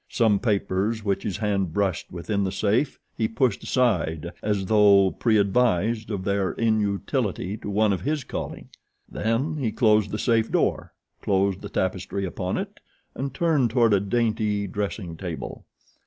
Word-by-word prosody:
Some 110 Hz, -4 st, +2 dB
papers 105 Hz, 0 st, 0 dB
which 100 Hz, -1 st, 0 dB
his 100 Hz, -, -3 dB
hand 100 Hz, -5 st, -1 dB
brushed 95 Hz, -3 st, -1 dB
within 90 Hz, +4 st, -2 dB
the 95 Hz, -, -1 dB
safe 105 Hz, +8 st, 0 dB, 0.2 s
he 110 Hz, -, 0 dB
pushed 115 Hz, -1 st, 0 dB
aside 85 Hz, -, 0 dB
as 100 Hz, -2 st, -1 dB
though 100 Hz, -2 st, +5 dB
preadvised 110 Hz, 0 st, +1 dB
of 100 Hz, -4 st, -3 dB
their 100 Hz, -1 st, 0 dB
inutility 105 Hz, -2 st, -1 dB
to 105 Hz, -, -7 dB
one 105 Hz, 0 st, +2 dB
of 95 Hz, -, -3 dB
his 150 Hz, 0 st, -1 dB
calling. -, -, -6 dB, 0.4 s
Then 130 Hz, +8 st, -1 dB
he 125 Hz, -7 st, -1 dB
closed 110 Hz, -2 st, +3 dB
the 105 Hz, -, -3 dB
safe 115 Hz, -1 st, +1 dB
door, -, -, 0 dB, 0.3 s
closed 95 Hz, -1 st, +1 dB
the 100 Hz, -, -7 dB
tapestry 95 Hz, 0 st, -2 dB
upon 90 Hz, -, -3 dB
it -, -, -5 dB, 0.3 s
and 135 Hz, +1 st, -4 dB
turned 150 Hz, -4 st, +2 dB
toward 115 Hz, -2 st, +3 dB
a 100 Hz, -, +4 dB
dainty 105 Hz, 0 st, 0 dB
dressing 100 Hz, -3 st, -4 dB
table. 85 Hz, -4 st, -6 dB
105 Hz, 155 wpm, -25 LUFS, 95-115 Hz, 0.4 s, though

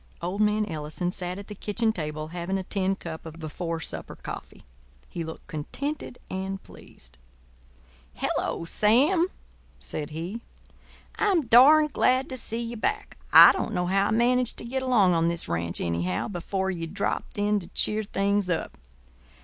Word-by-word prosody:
Old 180 Hz, +5 st, -3 dB
man 210 Hz, 0 st, +2 dB
Ellison 160 Hz, 0 st, -4 dB
sat 180 Hz, -1 st, -4 dB
at 200 Hz, -, -8 dB
the 210 Hz, -, -8 dB
kitchen 220 Hz, +2 st, 0 dB
table, 155 Hz, -2 st, -4 dB
having 175 Hz, +3 st, -3 dB
a 190 Hz, -, -3 dB
tin 195 Hz, 0 st, -1 dB
cup 165 Hz, -3 st, -7 dB
of 160 Hz, 0 st, -9 dB
before 165 Hz, +1 st, -4 dB
supper -, -, -6 dB
coffee. -, -, -9 dB, 0.4 s
He 170 Hz, -, -5 dB
looked 160 Hz, 0 st, -8 dB
contented 265 Hz, -, -5 dB
and 190 Hz, +1 st, -4 dB
pleased. -, -, -16 dB, 1.0 s
"Hello, 170 Hz, -, -2 dB
Sam," 275 Hz, -, +3 dB, 0.5 s
said 150 Hz, -2 st, -5 dB
he. 170 Hz, +9 st, -5 dB, 0.8 s
"I'm 380 Hz, -8 st, +2 dB
darned 290 Hz, +6 st, +7 dB
glad 255 Hz, +1 st, +2 dB
to 260 Hz, -, -4 dB
see 230 Hz, -1 st, -3 dB
ye 230 Hz, 0 st, -5 dB
back. 315 Hz, -, -2 dB
I -, -, +11 dB
don't 225 Hz, -, -3 dB
know 180 Hz, 0 st, 0 dB
how 195 Hz, +2 st, +2 dB
I -, -, -1 dB
managed 245 Hz, +2 st, +2 dB
to -, -, -4 dB
get 260 Hz, +3 st, -2 dB
along 235 Hz, -8 st, +4 dB
on 165 Hz, 0 st, +2 dB
this 170 Hz, 0 st, -2 dB
ranch, 85 Hz, 0 st, -1 dB
anyhow, 85 Hz, +2 st, -1 dB
before 190 Hz, 0 st, -2 dB
ye 165 Hz, -2 st, -4 dB
dropped 200 Hz, +4 st, -3 dB
in 205 Hz, 0 st, +2 dB
to 175 Hz, -, -10 dB
cheer 210 Hz, +3 st, +1 dB
things 200 Hz, -1 st, 0 dB
up. 170 Hz, -, -2 dB
195 Hz, 165 wpm, -26 LUFS, 165-230 Hz, 1.0 s, I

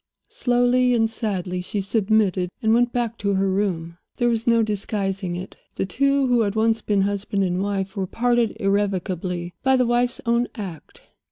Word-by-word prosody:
Slowly 245 Hz, 0 st, +2 dB
and 225 Hz, -1 st, +3 dB
sadly 190 Hz, -5 st, -3 dB
she 200 Hz, +3 st, -4 dB
submitted, 200 Hz, -2 st, +1 dB
and 220 Hz, 0 st, +2 dB
went 240 Hz, +1 st, +3 dB
back 235 Hz, -2 st, -2 dB
to 200 Hz, -1 st, 0 dB
her 195 Hz, +1 st, +1 dB
room. 180 Hz, -4 st, -2 dB, 0.2 s
There 240 Hz, -1 st, +1 dB
was 230 Hz, +1 st, -1 dB
no 230 Hz, -1 st, +4 dB
disguising 195 Hz, -3 st, -2 dB
it; 185 Hz, +2 st, -7 dB, 0.2 s
the -, -, -1 dB
two 275 Hz, +7 st, +2 dB
who 245 Hz, -2 st, +3 dB
had 205 Hz, -1 st, 0 dB
once 225 Hz, 0 st, +2 dB
been 205 Hz, -2 st, +1 dB
husband 200 Hz, 0 st, -1 dB
and 180 Hz, 0 st, 0 dB
wife 195 Hz, -1 st, -2 dB
were 190 Hz, -2 st, -2 dB
parted 240 Hz, +1 st, +1 dB
irrevocably 185 Hz, -3 st, -1 dB
by 265 Hz, 0 st, +3 dB
the 250 Hz, -, +3 dB
wife's 240 Hz, +1 st, +1 dB
own 235 Hz, +1 st, +2 dB
act. 190 Hz, -8 st, -8 dB
205 Hz, 175 wpm, -23 LUFS, 190-235 Hz, 0.2 s, no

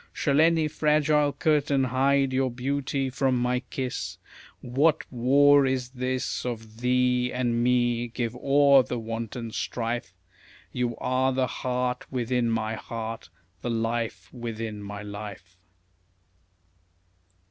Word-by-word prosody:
Shall 145 Hz, 0 st, +2 dB
any 165 Hz, -1 st, +4 dB
fragile 150 Hz, -1 st, +2 dB
curtain 145 Hz, -1 st, +1 dB
hide 135 Hz, +1 st, +2 dB
your 130 Hz, 0 st, +1 dB
beauty 135 Hz, +2 st, -2 dB
from 130 Hz, 0 st, +1 dB
my 125 Hz, +1 st, +1 dB
kiss? 125 Hz, 0 st, -5 dB, 0.4 s
What 145 Hz, +6 st, +2 dB
war 140 Hz, +3 st, +5 dB
is 130 Hz, -2 st, -1 dB
this 130 Hz, 0 st, -2 dB
of 110 Hz, -3 st, -6 dB
THEE 125 Hz, 0 st, +2 dB
and 120 Hz, -2 st, 0 dB
ME? 120 Hz, -1 st, +2 dB
Give 120 Hz, 0 st, -3 dB
o'er 140 Hz, +1 st, +5 dB
the 125 Hz, -1 st, -4 dB
wanton 115 Hz, 0 st, -5 dB
strife, 115 Hz, -5 st, -3 dB, 0.6 s
You 120 Hz, -2 st, -2 dB
are 130 Hz, +1 st, +1 dB
the 130 Hz, 0 st, +1 dB
heart 125 Hz, 0 st, -3 dB
within 125 Hz, -1 st, 0 dB
my 110 Hz, -1 st, -1 dB
heart, 115 Hz, -3 st, -6 dB, 0.3 s
the 120 Hz, -, -3 dB
life 115 Hz, 0 st, -2 dB
within 115 Hz, -3 st, -5 dB
my 100 Hz, 0 st, -7 dB
life. 100 Hz, -3 st, -8 dB
125 Hz, 120 wpm, -26 LUFS, 115-135 Hz, 0.6 s, war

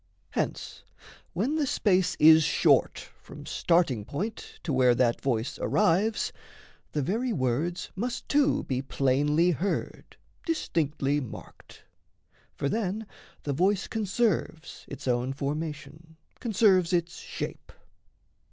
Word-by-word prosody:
Hence -, -, -3 dB, 0.5 s
when 245 Hz, -, 0 dB
the 295 Hz, -3 st, +1 dB
space 185 Hz, -7 st, +2 dB
is 160 Hz, +1 st, +8 dB
short 150 Hz, -, +2 dB
from -, -, -11 dB
starting 165 Hz, -11 st, +1 dB
point 200 Hz, -, -6 dB
To 155 Hz, -, -2 dB
where 125 Hz, -2 st, +4 dB
that 120 Hz, -1 st, +1 dB
voice 120 Hz, -3 st, -1 dB
arrives, 210 Hz, +3 st, +1 dB, 0.6 s
the 150 Hz, -, 0 dB
very 230 Hz, -, -1 dB
words 155 Hz, -, -1 dB
Must 240 Hz, +5 st, -4 dB
too 290 Hz, -1 st, +2 dB
be 130 Hz, -1 st, -2 dB
plainly 145 Hz, +5 st, +2 dB
heard, 180 Hz, +5 st, -3 dB, 0.3 s
distinctly 150 Hz, -, 0 dB
marked. 125 Hz, -6 st, -11 dB, 0.7 s
For 140 Hz, -, -2 dB
then 215 Hz, +4 st, -2 dB, 0.4 s
the 145 Hz, -, -2 dB
voice 185 Hz, +6 st, +1 dB
conserves 210 Hz, -6 st, -2 dB
its 140 Hz, -, -8 dB
own 125 Hz, +1 st, 0 dB
formation, 155 Hz, +2 st, -5 dB, 0.2 s
Conserves 195 Hz, -6 st, +3 dB
its 170 Hz, -1 st, -1 dB
shape. -, -, -7 dB
165 Hz, 115 wpm, -27 LUFS, 140-200 Hz, 0.7 s, is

